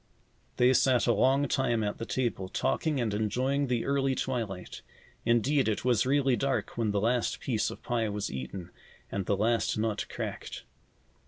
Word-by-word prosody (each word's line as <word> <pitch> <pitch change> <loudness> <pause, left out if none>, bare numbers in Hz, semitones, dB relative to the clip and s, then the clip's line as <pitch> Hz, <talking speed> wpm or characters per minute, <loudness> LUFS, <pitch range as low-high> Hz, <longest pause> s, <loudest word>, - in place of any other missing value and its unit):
They 125 +1 +5
sat 130 -1 +3
a 120 - +4
long 135 +6 +3
time 120 -4 +1
at 105 0 -3
the 115 - -5
table, 115 -7 -2
talking 145 +5 0
and 115 -4 0
enjoying 130 +7 0
the 120 -2 0
early 135 -1 +1
twilight. 110 -10 -4 0.4
Indeed, 125 +4 +3
it 110 +2 -1
was 125 -1 +3
really 135 -2 +3
dark 135 +1 -1
when 115 -2 0
the 100 0 +1
last 115 +3 0
piece 110 -5 0
of - - -10
pie 115 -3 0
was 105 0 -3
eaten 65 +8 -6 0.4
and 100 -2 -3
the 100 - +2
last 115 +2 +1
nut 110 -1 -1
cracked. - - -5
120 Hz, 170 wpm, -29 LUFS, 105-130 Hz, 0.4 s, They